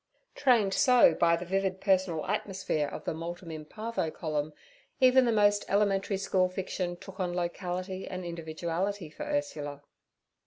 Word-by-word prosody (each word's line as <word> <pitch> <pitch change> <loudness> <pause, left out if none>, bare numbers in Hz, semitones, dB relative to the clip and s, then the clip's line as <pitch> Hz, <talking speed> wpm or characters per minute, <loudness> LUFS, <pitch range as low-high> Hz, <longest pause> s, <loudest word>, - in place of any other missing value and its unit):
Trained 235 -8 +3
so 250 -8 +6
by 170 0 +3
the 170 +2 -5
vivid 190 +1 -1
personal 185 -5 +1
atmosphere 190 -6 -1
of 150 - -7
the - - -2
'Multum 170 +1 -6
in—parvo' 165 +5 -4
column, 155 -1 -3 0.5
even 255 0 +6
the 235 - +2
most 205 -1 +3
elementary 200 -1 +2
school 185 -1 +1
fiction 185 -1 -3
took 190 +2 -12
on 180 -2 -1
locality 180 +2 -3
and 185 -1 -5
individuality 170 +2 -3
for 300 - -7
Ursula. 150 - -3
185 Hz, 145 wpm, -29 LUFS, 170-205 Hz, 0.5 s, so